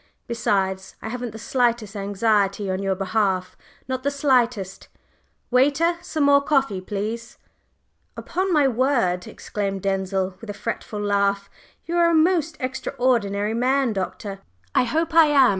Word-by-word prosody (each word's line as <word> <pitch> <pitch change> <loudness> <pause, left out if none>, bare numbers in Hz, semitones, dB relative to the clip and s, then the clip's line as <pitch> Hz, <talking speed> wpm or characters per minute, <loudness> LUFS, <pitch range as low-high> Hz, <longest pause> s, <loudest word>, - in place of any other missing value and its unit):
Besides, 190 -5 -1
I - - -6
haven't 245 +1 -4
the 220 - -9
slightest 235 -3 0
anxiety 200 -1 +1
on 185 +1 -2
your 195 -1 0
behalf 190 -1 0 0.3
not 260 -1 -2
the 280 - 0
slightest. 245 -9 0 0.6
Waiter, 290 +7 +3
some 310 -3 -2
more 280 0 +5
coffee, 270 -9 +1
please?" 215 +4 -5 0.8
"Upon 375 +2 -2
my 295 -4 +4
word!" 235 -8 +1
exclaimed 195 -2 -4
Denzil, 190 -1 -1
with 225 - -10
a 205 - -4
fretful 210 0 -4
laugh, 200 -1 0 0.3
"you 340 +1 -2
are 340 0 +5
a 335 - +3
most 325 -1 +2
extraordinary 240 -5 0
man, 255 +1 +1
Doctor!" 195 +1 -4 0.3
"I - - +3
hope 320 +6 -1
I 325 -1 +7
am!" 275 -3 +5
230 Hz, 140 wpm, -23 LUFS, 200-275 Hz, 0.8 s, I